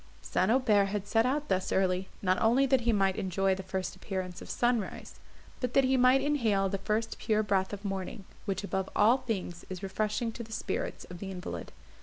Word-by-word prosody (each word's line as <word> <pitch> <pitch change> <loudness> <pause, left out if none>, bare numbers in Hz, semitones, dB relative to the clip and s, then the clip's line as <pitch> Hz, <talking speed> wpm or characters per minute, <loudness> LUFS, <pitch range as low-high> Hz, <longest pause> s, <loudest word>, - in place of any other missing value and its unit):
St. 185 - +1
Aubert 225 -5 +4
had 200 0 -3
set 225 +3 +2
out 290 +3 0
thus 190 0 0
early, 190 0 +1
not 185 0 +2
only 240 +5 +4
that 265 -1 +3
he 235 0 +2
might 195 -3 +2
enjoy 190 +1 +1
the 190 - -4
first 190 0 -4
appearance 185 -2 -5
of - - -10
sunrise, 240 -4 -1 0.4
but 250 -1 -3
that 275 - +6
he 265 0 +3
might 255 +1 +5
inhale 225 -10 +2
the 195 0 -2
first 215 +3 -1
pure 215 -1 +1
breath 195 -2 +1
of 205 0 -7
morning, 195 +1 -4 0.2
which 195 0 -2
above 190 -1 -2
all 225 +5 +5
things 195 -8 -4
is 185 -1 -6
refreshing 215 +4 -1
to 235 - -8
the 225 -1 -9
spirits - - -3
of 175 - -8
the 195 - -5
invalid. 185 -1 -6
205 Hz, 205 wpm, -30 LUFS, 190-235 Hz, 0.4 s, that